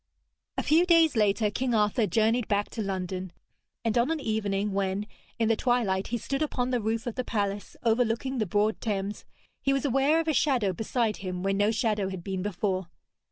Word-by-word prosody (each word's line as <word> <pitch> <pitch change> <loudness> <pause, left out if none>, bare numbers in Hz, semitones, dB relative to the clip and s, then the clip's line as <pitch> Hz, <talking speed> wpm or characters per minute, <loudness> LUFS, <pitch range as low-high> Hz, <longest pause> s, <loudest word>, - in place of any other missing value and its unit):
A - - 0
few 320 +4 +4
days 330 -4 +4
later 210 0 +2
King 250 +2 0
Arthur 210 +1 +2
journeyed 225 +2 +2
back 205 -1 0
to 225 - -4
London, 185 -2 -3 0.5
and 225 - +1
on 240 +5 +2
an 325 -1 0
evening 210 -4 -1
when, 195 +1 -1 0.3
in 225 -2 +1
the 225 - +3
twilight, 220 -6 +1
he 240 - -1
stood 275 +5 -3
upon 255 -4 -1
the 245 -2 +1
roof 225 +2 -1
of 240 - -3
the 255 - -2
palace 205 -3 -2
overlooking 235 +2 +1
the 215 - 0
broad 210 +4 +1
Thames, 205 -2 -3 0.4
he 275 - +2
was 275 +1 0
aware 275 +4 +3
of 325 - -2
a 315 - +2
shadow 250 -9 +2
beside 220 +2 -1
him 185 -1 -5
where 195 0 +1
no 205 +2 +2
shadow 215 -3 0
had 190 -3 -6
been 190 -1 -3
before. 190 -1 -2
220 Hz, 200 wpm, -28 LUFS, 200-245 Hz, 0.5 s, few